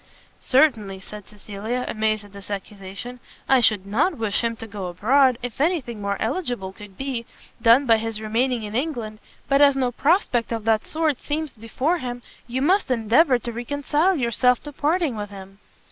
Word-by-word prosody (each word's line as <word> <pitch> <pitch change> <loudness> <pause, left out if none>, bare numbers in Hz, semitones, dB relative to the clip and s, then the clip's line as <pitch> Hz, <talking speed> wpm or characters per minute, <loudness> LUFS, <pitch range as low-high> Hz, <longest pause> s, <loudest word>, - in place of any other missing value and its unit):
"Certainly," 225 -9 +2
said 210 0 -10
Cecilia, 210 +4 -5
amazed 215 -1 -1
at 205 - -16
this 200 0 -11
accusation, 200 +4 -7 0.3
"I 265 -1 +5
should 215 -5 +3
not 280 - +1
wish 220 -3 0
him 230 0 0
to 225 - -8
go 200 -4 -6
abroad, 245 +8 +3
if 245 +2 -4
any 340 +3 +3
thing 235 -6 -8
more 200 0 -2
eligible 240 - -2
could 200 -1 -13
be, 260 -4 -4 0.3
done 235 +5 +6
by 225 -3 +5
his 225 -1 -3
remaining 230 +2 0
in 210 0 -6
England 235 -5 -3 0.3
but 275 +2 +3
as 280 -1 +6
no 255 -2 +1
prospect 265 - +1
of 225 -2 -2
that 220 -1 +2
sort 310 -4 0
seems 300 0 -3
before 255 +10 -1
him, 245 -2 -5 0.2
you 255 +2 -2
must 375 +4 +2
endeavour 250 +4 +4
to 240 0 -6
reconcile 290 +9 0
yourself 250 -2 +2
to 295 - -7
parting 300 -1 0
with 205 -1 -5
him." 195 0 -12
235 Hz, 180 wpm, -23 LUFS, 210-275 Hz, 0.3 s, done